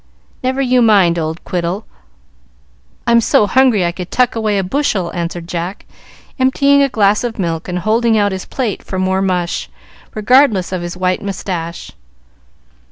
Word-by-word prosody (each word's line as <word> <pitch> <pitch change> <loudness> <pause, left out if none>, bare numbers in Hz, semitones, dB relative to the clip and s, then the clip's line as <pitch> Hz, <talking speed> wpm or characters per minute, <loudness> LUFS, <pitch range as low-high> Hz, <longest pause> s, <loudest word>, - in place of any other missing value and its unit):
"Never 260 +1 -1
you 250 -1 +3
mind, 195 -7 +4
old 160 +1 -4
quiddle. 180 +3 -3 1.2
I'm 235 0 +4
so 215 - +3
hungry 230 -3 +3
I 170 - 0
could 180 +1 -7
tuck 250 -2 +1
away 215 -2 0
a 195 - 0
bushel," 190 -5 -1
answered 170 -1 -4
Jack, 175 +2 -5 0.5
emptying 280 +2 +3
a 275 - +3
glass 210 -3 +2
of 235 -2 -4
milk 165 -4 -3
and 180 -1 -3
holding 220 +4 +2
out 205 -1 +2
his 190 -1 -5
plate 240 -7 -3
for 190 - -6
more 190 0 0
mush, 180 -3 -1 0.5
regardless 215 -4 +3
of 185 -2 -3
his 175 +1 -6
white 185 0 0
moustache. 180 -4 -5
195 Hz, 160 wpm, -16 LUFS, 175-235 Hz, 1.2 s, mind